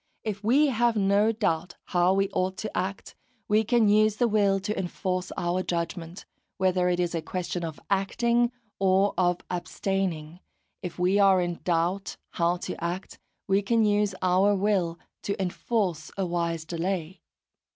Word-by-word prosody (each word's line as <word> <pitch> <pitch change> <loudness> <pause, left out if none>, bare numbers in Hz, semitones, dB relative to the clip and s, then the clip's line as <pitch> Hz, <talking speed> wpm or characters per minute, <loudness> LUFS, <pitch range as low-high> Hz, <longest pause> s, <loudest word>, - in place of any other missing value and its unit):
If 210 -2 -4
we 280 +7 +4
have 240 -2 +2
no 205 +2 +3
doubt 180 -6 -1 0.2
how 180 +1 +4
we 195 0 +2
ought 185 0 -1
to 215 - -5
act, 195 +1 -3 0.3
we 215 +1 +3
can 230 0 +3
use 215 +1 +4
the 240 +2 +2
will 200 -3 +2
to 210 +3 -2
enforce 185 0 -3
our 175 +1 0
judgment, 170 0 -4 0.3
whether 185 -1 +2
it 175 0 0
is 175 -1 0
a 165 - -1
question 175 +1 -4
of 160 -3 -5
acting 235 +5 +1 0.3
or 195 +1 +3
of 180 -1 +1
abstaining; 180 -3 -2 0.4
if 175 -3 -6
we 185 +3 +2
are 195 -2 +5
in 175 -1 -2
doubt 180 +3 0
how 170 +1 +1
to - - -5
act, 175 +3 -4 0.3
we 195 +1 +2
can 225 +2 +2
use 205 -1 +2
our 185 +3 +4
will 190 -4 +1 0.2
to 200 +1 -3
enforce 185 -3 -1
a 195 - 0
wise 170 -2 -2
delay. 175 +1 -3
190 Hz, 160 wpm, -27 LUFS, 175-205 Hz, 0.4 s, are